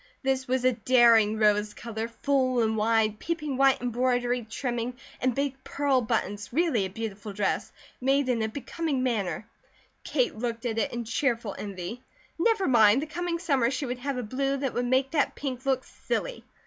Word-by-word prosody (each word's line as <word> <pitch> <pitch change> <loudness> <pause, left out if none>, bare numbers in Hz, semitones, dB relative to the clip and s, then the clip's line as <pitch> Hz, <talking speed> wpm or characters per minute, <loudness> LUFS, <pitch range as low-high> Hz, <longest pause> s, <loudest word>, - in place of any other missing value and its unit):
This 265 0 0
was 255 0 0
a 255 - +6
daring 230 -2 +5
rose 210 -1 +2
colour, 225 -1 -4
full 255 0 +1
and 220 0 +1
wide, 220 -1 +2
peeping 305 -5 -3
white 270 0 +4
embroidery 245 0 0
trimming, 240 0 -3 0.3
and 255 -2 +1
big 275 -1 -2
pearl 280 -3 +1
buttons, 210 -3 -2
really 280 - +2
a - - -4
beautiful 210 0 -6
dress, 195 0 -1 0.3
made 270 +1 +2
in 240 -3 +1
a 220 - +1
becoming 285 +2 -2
manner. 215 -4 -1 0.6
Kate 470 -11 0
looked 230 +1 -4
at 225 -2 -1
it 215 - 0
in 240 0 -3
cheerful 230 -3 -1
envy. 200 +4 -6 0.4
Never 435 +1 +2
mind! 235 0 +5
The - - -3
coming 340 +2 -3
summer 280 -9 +1
she 275 +2 -2
would 250 0 -4
have 275 +1 -3
a 250 - -2
blue 270 +5 -1
that 270 -2 -2
would 245 0 -1
make 260 +2 +2
that 300 -3 +1
pink 265 -1 -5
look 260 -1 +2
silly. - - -4
250 Hz, 180 wpm, -27 LUFS, 225-275 Hz, 0.6 s, a